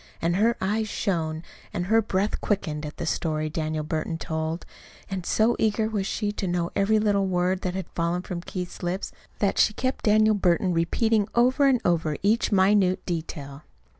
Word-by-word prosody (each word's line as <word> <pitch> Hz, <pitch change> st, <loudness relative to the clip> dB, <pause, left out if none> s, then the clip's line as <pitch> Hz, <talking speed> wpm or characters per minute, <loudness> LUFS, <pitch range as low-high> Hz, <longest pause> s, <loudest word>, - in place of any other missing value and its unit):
And 170 Hz, +2 st, 0 dB
her 230 Hz, +3 st, +3 dB
eyes 215 Hz, +3 st, -1 dB
shone 160 Hz, -6 st, -2 dB, 0.3 s
and 175 Hz, -, -2 dB
her 225 Hz, +4 st, +4 dB
breath 205 Hz, -1 st, -1 dB
quickened 155 Hz, -7 st, -1 dB
at 150 Hz, -, -10 dB
the -, -, -3 dB
story 155 Hz, -1 st, -1 dB
Daniel 155 Hz, -1 st, -2 dB
Burton 160 Hz, +1 st, -2 dB
told; 160 Hz, +1 st, -3 dB, 0.5 s
and 185 Hz, -2 st, -4 dB
so 225 Hz, +2 st, +3 dB
eager 220 Hz, 0 st, +1 dB
was 205 Hz, -3 st, -2 dB
she 210 Hz, -2 st, -1 dB
to 205 Hz, -2 st, -3 dB
know 175 Hz, -1 st, -1 dB
every 205 Hz, +2 st, +3 dB
little 205 Hz, -2 st, +2 dB
word 180 Hz, 0 st, 0 dB
that 185 Hz, 0 st, -2 dB
had 190 Hz, -2 st, -3 dB
fallen 170 Hz, +1 st, -1 dB
from 175 Hz, -2 st, -5 dB
Keith's 180 Hz, 0 st, -6 dB
lips 180 Hz, +2 st, -3 dB, 0.3 s
that 200 Hz, -2 st, 0 dB
she 215 Hz, -, +4 dB
kept 260 Hz, +1 st, -2 dB
Daniel 215 Hz, 0 st, +5 dB
Burton 185 Hz, -2 st, +2 dB
repeating 205 Hz, +6 st, +1 dB
over 255 Hz, +4 st, +4 dB
and 260 Hz, -3 st, +4 dB
over 160 Hz, -4 st, +1 dB
each 220 Hz, +4 st, +2 dB
minute 190 Hz, -1 st, +3 dB
detail. 155 Hz, -5 st, -5 dB
185 Hz, 180 wpm, -25 LUFS, 165-210 Hz, 0.5 s, Daniel